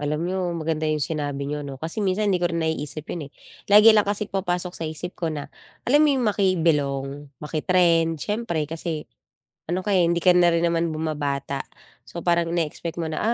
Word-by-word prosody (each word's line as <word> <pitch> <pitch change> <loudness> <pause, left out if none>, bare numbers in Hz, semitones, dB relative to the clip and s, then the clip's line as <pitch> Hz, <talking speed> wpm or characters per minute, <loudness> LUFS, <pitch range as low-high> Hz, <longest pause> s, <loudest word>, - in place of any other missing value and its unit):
Alam 150 +1 -1
niyo 185 +1 -2 0.2
maganda 155 -1 -1
yung 155 0 +1
sinabi 145 -3 -3
niyo 150 +1 -3
'no 140 -1 -7
kasi 165 +8 -4
minsan 200 +2 +1
hindi 190 -3 +2
ko 175 - +3
rin 170 - -2
naiisip 155 -1 -3
yun 155 -5 -5
eh, - - -36 0.4
lagi 215 +2 +9
lang 210 - +5
kasi 205 +1 -1
pumapasok 180 -2 -2
sa - - -7
isip 160 +3 -6
ko 165 - -2
na 145 -2 -5 0.4
alam 290 +4 +5
mo 305 - +5
'yong 260 -3 +1
maki-belong, 160 -9 +1 0.3
maki-trend, 165 +1 +2
siyempre 205 -5 -2
kasi 160 0 -4 0.6
ano 175 +2 -1
ka, 205 - -2
eh, 175 -2 +4
hindi 170 0 +1
ka 180 - +6
na 175 -1 +5
rin 165 0 +1
naman 170 -1 +1
bumabata. 145 -3 -2 0.4
So 170 - -7
parang 170 -1 +1
ine-expect 170 0 -3
mo 160 - -2
na, 155 - -3
165 Hz, 200 wpm, -24 LUFS, 150-180 Hz, 0.6 s, lagi